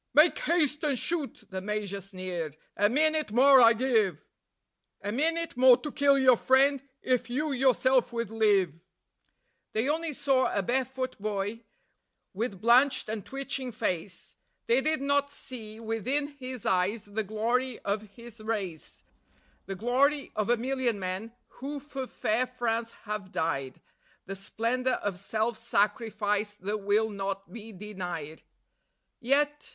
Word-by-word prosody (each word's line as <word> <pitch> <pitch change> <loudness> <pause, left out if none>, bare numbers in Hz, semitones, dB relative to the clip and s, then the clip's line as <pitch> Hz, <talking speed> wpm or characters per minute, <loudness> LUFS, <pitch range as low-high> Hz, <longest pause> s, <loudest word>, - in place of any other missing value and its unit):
"Make 305 +3 +6
haste 300 -3 +1
and 285 -4 +1
shoot," 305 +1 -3
the 190 0 -4
Major 205 -1 -3
sneered; 180 -5 -5 0.2
"a 205 +1 +3
minute 310 +1 +2
more 265 +3 +7
I 230 0 +8
give; 220 - +1 0.8
A 205 - -2
minute 330 +7 0
more 250 0 +7
to 290 +4 -6
kill 280 0 +4
your 255 -3 +6
friend, 270 +2 +4 0.2
if 250 -2 +1
you 295 +5 -1
yourself 260 -1 +3
would 230 -2 -3
live." 200 -7 +2 0.9
They 225 +4 +1
only 320 +1 0
saw 265 -1 +2
a 200 - 0
bare 255 +6 +1
foot 260 0 -5
boy, 210 +2 -3 0.7
with 205 -1 -3
blanched 245 +4 +4
and 215 -2 -3
twitching 270 0 -4
face; 180 -4 -3 0.3
They 240 +3 +3
did 310 0 0
not 285 0 +2
see 225 -6 -8
within 230 +6 -1
his 255 -5 -8
eyes 190 +4 +1
the 205 +2 -3
glory 230 +4 -1
of 205 +1 -1
his 235 -1 -12
race; 200 -7 -4 0.6
The 195 - -4
glory 270 +7 +1
of 215 +1 -1
a 240 - +4
million 250 -2 -1
men 190 +4 -4 0.3
who 285 +3 -4
for 270 -2 -6
fair 240 +3 0
France 235 -2 -2
have 210 -3 -5
died, 135 -5 -2 0.5
The 195 - -5
splendour 235 +6 -1
of 200 -3 -3
self 220 +3 -1
sacrifice 210 -1 0
that 210 +2 -3
will 210 +2 +1
not 195 -1 -4
be 225 -1 -8
denied. 180 -6 -6 0.8
Yet 290 +3 +1
230 Hz, 145 wpm, -29 LUFS, 205-265 Hz, 0.9 s, I